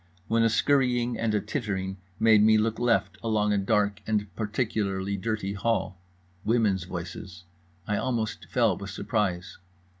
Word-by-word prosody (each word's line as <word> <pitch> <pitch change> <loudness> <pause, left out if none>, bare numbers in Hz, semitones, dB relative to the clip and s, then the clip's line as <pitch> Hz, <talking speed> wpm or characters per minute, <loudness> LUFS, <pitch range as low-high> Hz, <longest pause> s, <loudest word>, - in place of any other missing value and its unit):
when 115 0 +2
a 115 - +4
scurrying 125 -1 +2
and 110 -2 +1
a - - +3
tittering 95 -7 -3 0.2
made 110 -1 +6
me 110 +1 +6
look 110 +1 0
left, 120 -1 +1
along 105 -2 +1
a - - +2
dark 100 0 +1
and 105 -2 -1
particularly 105 -3 -1
dirty 100 0 -2
hall. 100 -3 -1 0.4
Women's 105 -6 +1
voices… 90 0 -7 0.4
I 105 +1 0
almost 115 -2 -2
fell 115 -6 +2
with 100 +2 -7
surprise. 100 -4 -2
105 Hz, 145 wpm, -27 LUFS, 100-115 Hz, 0.4 s, made